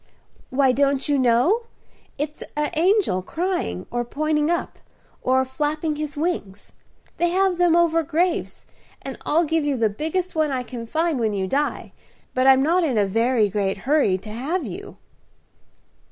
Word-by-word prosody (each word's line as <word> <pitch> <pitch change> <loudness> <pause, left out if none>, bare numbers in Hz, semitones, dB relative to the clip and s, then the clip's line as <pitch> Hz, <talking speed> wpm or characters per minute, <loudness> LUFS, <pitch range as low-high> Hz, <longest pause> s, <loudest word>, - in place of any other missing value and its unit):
"Why, 265 0 +3
don't 275 +1 +1
you 290 -2 +2
know? 260 - +3 0.5
It's 295 +1 -4 0.2
a 300 0 0
angel 345 - +2
crying, 320 - -3
or 240 0 -1
pointing 300 +4 0
up, 345 0 -2 0.4
or 260 +1 +2
flapping 300 +3 -2
his 300 -1 -4
wings. 250 - -3 0.5
They 345 - +2
have 375 0 +1
them 350 -2 +4
over 335 -1 +3
graves; 340 +3 -1 0.4
and 270 - -6
I'll 325 +3 +3
give 320 0 0
you 290 -2 0
the 225 -2 +2
biggest 320 - -2
one 310 -2 +1
I 260 -2 -2
can 235 -2 -7
find 320 +1 0
when 220 -2 0
you 195 -1 -1
die. 285 +10 -2 0.4
But 255 +1 +2
I'm 265 0 +6
not 345 +4 +2
in 270 -8 0
a 205 - +3
very 225 +2 +2
great 195 -1 -1
hurry 270 -10 +3
to 210 +3 -11
have 290 +11 -2
you." - - -8
290 Hz, 165 wpm, -23 LUFS, 240-330 Hz, 0.5 s, I'm